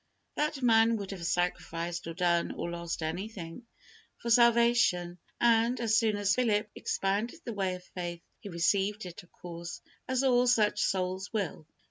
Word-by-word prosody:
That 300 -3 -2
man 225 -1 +5
would 200 -2 -6
have 175 -4 -4
sacrificed, 175 -1 -2
or 165 - -6
done, 175 -1 +1
or 170 - -4
lost 170 -1 -4
anything, 180 +4 -6 0.5
for 235 - -3
salvation, 235 -7 +4 0.2
and, 235 +1 +3
as 225 -2 +2
soon 220 -2 +3
as 205 0 +2
Philip 215 -4 +1
expounded 210 +11 -2
the 235 - -4
way 190 -3 -1
of 180 - -11
faith, 175 -2 -6 0.2
he 205 - -9
received 195 +4 0
it, 175 -2 -8
of 175 - -23
course, 170 0 -8 0.3
as 260 +1 0
all 250 -1 +4
such 215 -4 +3
souls 185 +1 -1
will. 195 -7 -3
200 Hz, 160 wpm, -30 LUFS, 175-230 Hz, 0.5 s, man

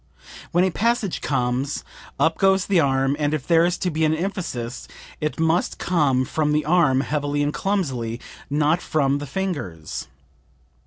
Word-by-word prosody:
When 175 +2 +3
a 190 - +2
passage 230 -1 0
comes 130 +1 -1 0.4
up 160 0 +2
goes 190 0 +3
the 195 -3 +3
arm, 135 -1 +2
and 150 0 +1
if 140 - -5
there 165 -1 +4
is 175 0 0
to 180 - -1
be 160 +1 -1
an 155 0 +3
emphasis 160 -10 -4 0.3
it 150 +1 -3
must 165 +2 +1
come 140 -7 +2
from 150 +2 0
the 150 0 +1
arm, 150 -5 +3
heavily 145 0 -1
and 145 +1 -1
clumsily, 130 - -1 0.3
not 150 +4 +2
from 140 -2 +1
the 145 - -6
fingers. 135 - -4
150 Hz, 160 wpm, -23 LUFS, 135-175 Hz, 0.4 s, there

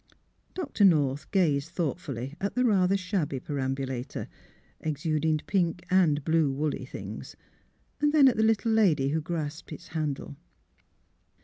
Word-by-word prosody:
Dr. 290 - -1
North 145 -7 +3
gazed 155 -6 +1
thoughtfully 145 -6 -3
at 200 - -2
the 250 0 +2
rather 195 -3 +3
shabby 185 -8 -2
perambulator, 135 -2 -3 0.5
exuding 155 +1 0
pink 175 -2 0
and 160 -6 +3
blue 160 -3 +3
woolly 150 +2 -2
things; - - -8 0.6
then 295 -1 +5
at 255 - +4
the 220 - +1
little 220 0 +2
lady 170 -12 +3
who 160 +2 0
grasped 160 +1 -5
its 165 +4 -9
handle. 150 -3 -3
160 Hz, 125 wpm, -28 LUFS, 145-195 Hz, 0.6 s, then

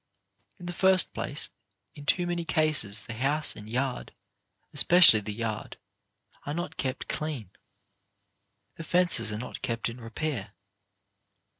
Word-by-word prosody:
In - - -10
the 175 - -5
first 190 0 +4
place, 145 - 0 0.4
in 145 -1 -12
too 175 +3 +2
many 175 -1 -2
cases, 155 - 0
the 115 - -7
house 140 +6 +1
and 105 +1 -11
yard, 125 +2 -3 0.6
especially 175 -11 +7
the 105 0 -5
yard, 110 0 -5 0.7
are 145 - -5
not 175 +1 -5
kept 130 0 -4
clean. 145 - -5 1.3
The 165 - -7
fences 175 - +3
are 105 - -4
not 125 +3 -8
kept 115 0 -3
in 120 +2 -10
repair. 115 -3 -5
135 Hz, 135 wpm, -27 LUFS, 115-165 Hz, 1.3 s, especially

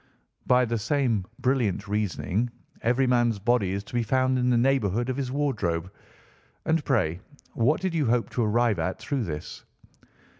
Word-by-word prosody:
"By 125 0 +5
the 115 -1 -1
same 120 -4 0
brilliant 115 -6 0
reasoning, 105 +2 -1 0.3
every 125 +3 +2
man's 120 -3 +2
body 105 -2 +1
is 100 0 -3
to - - -15
be 120 - +1
found 130 +2 +1
in 125 0 +2
the 120 - +3
neighbourhood 120 -2 +1
of 130 - -1
his 130 -2 -2
wardrobe. 100 - -1 0.7
And 160 -1 +1
pray 90 - +1 0.3
what 125 +9 +2
did 185 -2 -1
you 155 -6 +1
hope 120 0 +1
to 120 - 0
arrive 115 0 +2
at 95 - -1
through 135 -6 -2
this?" 75 -3 -6
120 Hz, 165 wpm, -26 LUFS, 105-130 Hz, 0.7 s, By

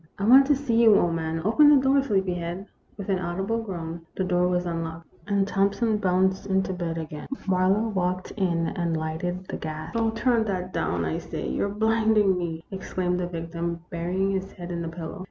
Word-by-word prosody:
" - - -41
I 195 - -4
want 265 +4 +7
to 290 - +4
see 245 -4 +1
you, 220 -3 +7
old 170 -1 +2
man. 160 0 -2
Open 290 +8 +6
the 295 - +8
door, 270 +1 +3
sleepyhead." 185 -6 -1 0.3
With 200 - -6
an 190 -2 +1
audible 195 +6 -2
groan, 170 -5 -6
the 190 - -1
door 180 -1 +2
was 180 0 0
unlocked, 165 -1 -4 0.2
and 200 -1 +1
Thompson 200 +3 +1
bounced 190 -1 +1
into 190 -1 +1
bed 170 -2 -3
again. 155 -2 -6 0.2
Marlowe 190 +4 +2
walked 185 -2 -1
in 170 -5 0
and 170 -3 -1
lighted 170 +4 -3
the - - -4
gas. 155 +1 -6
" - - -13
Oh, 225 -1 +2
turn 225 0 +1
that 185 -3 -3
down, 85 -1 -1
I 80 - -2
say; - - -5
you 65 - -1
're - - -4
blinding 215 -1 +3
me! 165 -2 -4
" - - -36
exclaimed 185 -1 -2
the 180 - -1
victim, 170 0 -4
burying 180 +3 -1
his 195 0 -3
head 175 0 -8
in 170 -1 -3
the 165 - -3
pillow. 165 +3 -7
185 Hz, 210 wpm, -25 LUFS, 170-205 Hz, 0.3 s, the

